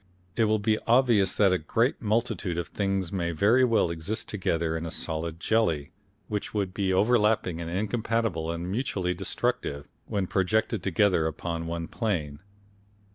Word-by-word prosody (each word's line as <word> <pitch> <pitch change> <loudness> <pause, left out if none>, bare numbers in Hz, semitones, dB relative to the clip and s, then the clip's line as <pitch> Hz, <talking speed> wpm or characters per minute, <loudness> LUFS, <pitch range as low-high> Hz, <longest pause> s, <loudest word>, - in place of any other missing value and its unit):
It 115 - +3
will 110 0 +2
be 110 +1 +1
obvious 115 -6 +4
that 100 -3 +4
a 95 - +1
great 115 - 0
multitude 110 -5 -1
of 85 -3 -3
things 95 -3 -1
may 85 -3 -1
very 105 +10 +3
well 115 -8 +3
exist 85 +7 -3
together 85 -5 -1
in 80 - -3
a 85 - -4
solid 80 0 -2
jelly, 85 -9 +1 0.4
which 105 0 -4
would 100 -3 -1
be 95 -1 0
overlapping 105 -4 +2
and 85 - -5
incompatible 105 -2 -1
and 85 +2 -3
mutually 95 -6 -1
destructive, 70 -4 -2 0.2
when 100 -2 -1
projected 100 +3 0
together 90 -2 +2
upon 85 +1 -4
one 85 0 -3
plane. 80 -11 -2
95 Hz, 155 wpm, -27 LUFS, 85-110 Hz, 0.4 s, obvious